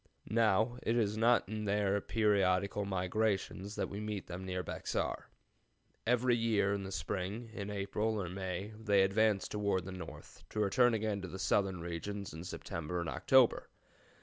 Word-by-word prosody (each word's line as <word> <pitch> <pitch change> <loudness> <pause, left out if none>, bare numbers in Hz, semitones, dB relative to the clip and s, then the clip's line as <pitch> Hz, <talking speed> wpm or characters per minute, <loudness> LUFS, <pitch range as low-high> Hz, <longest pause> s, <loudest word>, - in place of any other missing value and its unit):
Now, 110 +2 +3
it 115 +2 +1
is 105 -3 +1
not 115 0 +4
in 105 +1 -4
their 100 0 +1
periodical 100 -2 +2
migrations 100 +1 -1
that - - -1
we 100 - -6
meet 105 -2 -4
them 90 +1 -6
near 90 -1 -3
Bexar. - - -3 0.8
Every 125 +1 +3
year 110 -4 +2
in 100 - -2
the 95 0 -6
spring, 100 +5 -3
in 100 -2 -5
April 105 +2 -1
or 95 - -2
May, 95 +3 -4
they 100 -3 +4
advance 100 +1 +2
toward 100 -3 0
the 95 - -6
north, 90 -1 -9
to 110 - -4
return 115 +4 +4
again 105 -2 -1
to 95 - -5
the 95 - -7
southern 95 -2 +1
regions 95 +4 -5
in 80 +2 -7
September 85 -1 -4
and 85 - -2
October. 130 -3 +4
100 Hz, 165 wpm, -34 LUFS, 95-110 Hz, 0.8 s, not